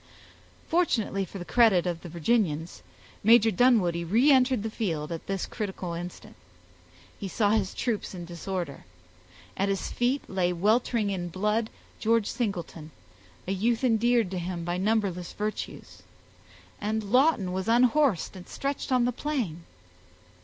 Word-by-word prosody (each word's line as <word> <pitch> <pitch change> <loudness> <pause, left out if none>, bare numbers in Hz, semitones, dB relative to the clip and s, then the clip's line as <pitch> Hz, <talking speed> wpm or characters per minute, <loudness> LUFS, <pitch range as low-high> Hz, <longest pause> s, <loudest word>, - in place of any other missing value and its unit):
Fortunately 230 - +1
for 195 - -9
the 175 - -7
credit 220 -7 +4
of 175 -2 -2
the 175 - -9
Virginians, 170 -2 0 0.4
Major 225 +1 +6
Dunwoodie 185 -6 +3
reentered 255 - +4
the 220 - -3
field 165 -10 -3
at 165 - -6
this 195 -2 -2
critical 190 -5 -5
instant; 175 +1 -8 0.8
he 200 - -4
saw 205 +2 +1
his 210 -3 0
troops 220 -5 -2
in 175 -1 -6
disorder; 170 - -5 0.7
at 195 +1 0
his 195 -1 -2
feet 250 +3 0
lay 180 -2 0
weltering 215 +3 +1
in 180 -2 -3
blood 210 +5 0 0.3
George 225 -1 +2
Singleton, 175 -9 -4 0.6
a - - -1
youth 225 +5 0
endeared 235 -3 +2
to 185 - -2
him 175 -1 -4
by 175 +1 -2
numberless 195 -4 0
virtues, 210 +1 -5 0.8
and 215 +1 -1
Lawton 245 - +3
was 190 +2 -3
unhorsed 245 - +3
and 180 -1 -11
stretched 275 0 -3
on 250 -2 +3
the 245 - +1
plain. 235 - -3
205 Hz, 140 wpm, -27 LUFS, 180-235 Hz, 0.8 s, Major